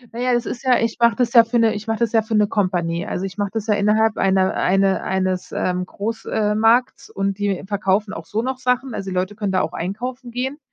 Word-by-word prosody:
Na - - -5
ja, 250 0 +1
das 240 - -1
ist 240 - -5
ja 255 -2 +4
ich 230 0 -2
mache 235 -1 +4
das 240 -2 0
ja 235 -2 +9
für 230 +2 -1
'ne 225 -1 +3
ich 215 +2 -7
mache 225 - 0
das 235 -1 0
ja 225 -1 +3
für 220 +1 -3
'ne 210 0 +4
Company. 175 -4 -1
Also, 185 - -3
ich 195 +2 -8
mache 205 -1 0
das 220 -2 -3
ja 215 - +2
innerhalb 210 +1 +2
eine 190 -1 +2
eine 195 0 +2
eines, 185 -1 -2
ähm, 180 0 -1
Groß 225 +2 -5
ähm, 210 0 +1
Markts 235 +3 +2
und 195 0 -2
die 200 -2 -1
verkaufen 200 0 0
auch 165 - -8
so 220 +2 -2
noch 260 0 -3
Sachen, 250 0 0
also 195 -1 -5
die 185 - -5
Leute 185 +3 -1
können 205 -2 -2
da 190 - +2
auch 160 - -3
einkaufen 245 +9 -5
gehen, 260 +5 -4
210 Hz, 255 wpm, -21 LUFS, 190-235 Hz, -, ja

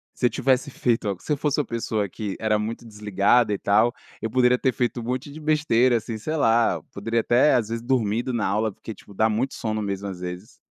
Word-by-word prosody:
se 125 - -1
eu - - 0
tivesse 130 +5 +1
feito 115 -5 0
a 100 - -1
se - - -6
eu - - -1
fosse 150 +1 0
uma - - -6
pessoa 110 -4 -2
que 105 -1 -5
era 110 -1 +2
muito 115 +2 -4
desligada 105 +1 +2
e - - -1
tal, 110 +4 +3 0.4
poderia 125 0 +4
ter 130 - +1
feito 120 -1 -1
um - - -7
monte 130 +4 -3
de 155 - -9
besteira 145 -6 +2
assim, 115 0 -5
sei 155 +9 -3
lá, 115 -5 +3
eu 80 - -8
poderia 115 +3 -1
até 120 +6 +4
às 115 -3 0
vezes 115 0 -3
dormido 120 -1 0
na 115 - 0
aula 110 +3 +1
porque 110 - -9
tipo 100 - -16
dá 110 +3 +2
muito 125 +5 -1
sono 110 -1 -2
mesmo 100 0 -3
às 90 -2 -7
vezes. 90 +3 -7
115 Hz, 235 wpm, -24 LUFS, 105-125 Hz, 0.4 s, poderia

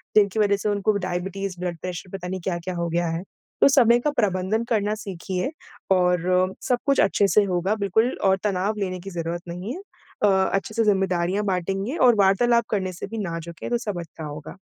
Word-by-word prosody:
तो 210 - +9
उनकी 200 +2 -1
वजह 200 -1 +4
से 210 - -2
उनको 205 +1 +1
डायबिटीज, 190 +1 -3
ब्लड 175 -2 -3
प्रेशर 180 0 -6
पता 180 -1 -7
नहीं 185 0 -4
क्या-क्या 175 0 -3
हो 170 -1 -2
गया 170 +1 0
है? 165 +2 -3 0.4
तो - - +8
समय 240 -3 +5
का 295 +4 0
प्रबंधन 195 +2 +1
करना 210 -2 +1
सीखिए, 190 - -4 0.4
और 180 0 +3
सब 250 - +3
कुछ 275 -1 +2
अच्छे 200 +1 +3
से 210 +1 +4
होगा 185 +2 0
बिल्कुल 220 +4 +1
और 190 0 +4
तनाव 205 +1 0
लेने 185 -2 -2
की 195 +2 -8
ज़रूरत 170 -1 -4
नहीं 180 +7 -5
है। 375 - -7 0.4
अ, - - +6 0.3
अच्छे 195 +2 -1
से 230 - +3
जिम्मेदारियाँ 190 -1 +1
बाँटेंगे 195 - -1
और 240 - +6
वार्तालाप 235 +4 +4
करने 190 -3 -1
से 175 - -6
भी 225 +2 -6
ना 170 -4 -3
झुके, 170 0 -7
तो 240 - +2
सब 205 -7 -4
अच्छा 160 -1 -10
होगा। 150 +4 -8
190 Hz, 205 wpm, -24 LUFS, 180-210 Hz, 0.4 s, तो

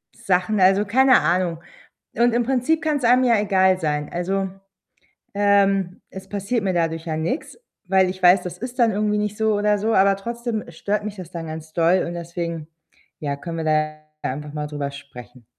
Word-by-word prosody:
Sachen, 195 -2 0
also 190 +2 +5
keine 260 +5 +5
Ahnung 175 -2 0 0.6
und 240 0 +3
im 240 +1 +2
Prinzip 265 +6 +1
kann‘s 295 -4 0
einem 250 +2 +5
ja 230 -4 +4
egal 190 -2 +3
sein. 150 -3 -2
Also, 190 +2 -1 0.9
ähm, 195 -2 +2
es 190 0 -10
passiert 205 +3 -2
mir 190 -2 0
dadurch 165 -1 -1
ja 160 - -2
nix, 170 - -3 0.3
weil 190 -1 +3
ich 185 0 -7
weiß, 180 +1 +7
das 180 -1 -6
ist 245 +4 -7
dann 230 -2 +4
irgendwie 210 +1 0
nicht 210 0 -3
so 220 -1 +1
oder 210 0 +2
so, 220 +2 0
aber 195 +1 +4
trotzdem 235 +1 -4
stört 205 +5 -2
mich 210 -1 -6
das 180 -3 -8
dann 165 -2 -6
ganz 155 0 -8
doll 170 +2 +3
und 175 - -5
deswegen, 170 -2 -5 0.5
ja, 140 -2 -2
können 165 +2 -6
wir 160 - -3
ja 155 - +2 0.5
da - - -1
ja - - -2
einfach 150 0 -8
mal 150 -1 -3
drüber 145 -1 -4
sprechen. 125 -4 -12
190 Hz, 195 wpm, -22 LUFS, 165-215 Hz, 0.9 s, weiß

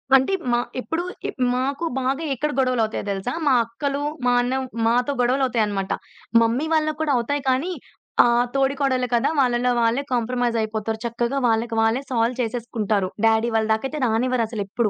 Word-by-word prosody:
అంటే 265 +8 +3 0.2
మా 240 - +3 0.2
ఎప్పుడు 325 +5 -2 0.2
ఇ - - -2 0.3
మాకు 275 +6 -1
బాగా 270 +5 -1
ఎక్కడ 300 +4 -1
గొడవలు 255 -3 +2
అవుతాయో 220 -1 -3
దెలుసా? 195 +6 -3
మా 270 - +5
అక్కలు, 275 +5 -3 0.2
మా 245 - +4
అన్న 245 +1 -1 0.3
మాతో 245 +4 +2
గొడవలువుతాయిన్నమాట. 235 -6 +1 0.5
మమ్మీ 235 +6 +1
వాళ్ళకి 310 -1 +1
కూడా 305 -3 +1
అవుతాయి 285 +5 -1
కానీ 270 +8 +1 0.5
ఆహ్, 240 0 +3
తోడికోడళ్ళు 270 -2 +1
కదా! 235 - +3
వాళ్ళలో 250 -1 +2
వాళ్ళే 230 +4 +2
కాంప్రమైజ్ 240 0 0
అయిపోతారు. 220 0 -2
చక్కగా 235 +3 -1
వాళ్ళకి 225 0 0
వాళ్ళే 225 +4 +2
సాల్వ్ 235 -1 +1
చేసేసుకుంటారు. 220 -4 -1 0.2
డ్యాడీ 225 +1 +3
వాళ్ళ 220 0 +2
దాకైతే 270 +7 -3
రానివ్వరసలెప్పుడు. 225 -2 0
245 Hz, 150 wpm, -23 LUFS, 225-265 Hz, 0.5 s, మా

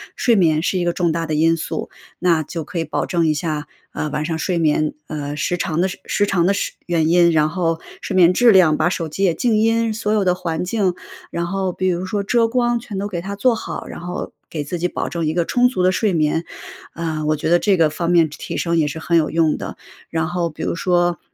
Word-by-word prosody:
睡 235 - +3
眠 160 -6 +3
是 185 - 0
一 175 - 0
个 175 - +1
重 175 -2 +1
大 165 +1 -2
的 155 - -3
因 165 +2 +3
素。 - - -4 0.3
那 170 -3 +2
就 165 +2 -5
可 175 +4 -7
以 165 - +1
保 155 - -2
证 170 -2 +1
一 155 - +3
下， 150 -1 -3 0.2
啊， - - -3
晚 150 +1 -2
上 160 +1 -2
睡 175 +2 -1
眠， 155 -1 +1
呃， 145 -1 -4
时 175 +4 -1
长 160 -1 -1
的 185 - +2 0.2
时 205 - +1
长 175 -4 +2
的 195 - +3
时 200 - -2
原 165 -3 +1
因， 170 0 +5
然 155 -1 +3
后 165 -1 -1 0.2
睡 195 - -4
眠 180 -2 +6
质 240 +4 +5
量 175 -6 +5
把 155 - +2
手 170 -3 -2
机 195 +6 -3
也 180 -4 +3
静 230 +3 +1
音， 225 +1 +2
所 215 -1 -1
有 210 -2 +2
的 180 -1 +2
环 170 -3 -3
境 190 -1 0 0.4
然 170 0 -2
后 190 0 -2
比 185 - -1
如 180 0 0
说 205 +1 -2
遮 230 +3 +2
光， 240 0 +1
全 225 -4 -7
都 200 +1 -2
给 185 -4 -4
它 200 +3 -5
做 235 +4 +2
好。 - - -6
然 - - -8
后 175 +1 -5 0.2
给 155 -3 -4
自 160 +5 -4
己 175 - +1
保 - - -3
证 170 -2 -2
一 155 - 0
个 170 0 +1
充 245 +6 +3
足 250 -7 -2
的 185 - +4
睡 205 0 +1
眠， 160 +1 +1 0.5
啊， 160 -2 -3
我 155 +1 +2
觉 150 - -2
得 175 - +6
这 200 0 +3
个 160 -2 +4
方 170 +3 -3
面 165 -2 +4
提 150 - -11
提 - - -5
升 170 -1 0
也 155 -2 +2
是 150 +2 -5
很 170 +1 +1
有 155 -2 +2
用 160 -1 +2
的。 - - -7 0.3
然 160 -1 -1
后 175 0 -1
比 155 - -10
如 - - -1
说 175 -1 +1
170 Hz, 280 characters per minute, -20 LUFS, 160-190 Hz, 0.5 s, 眠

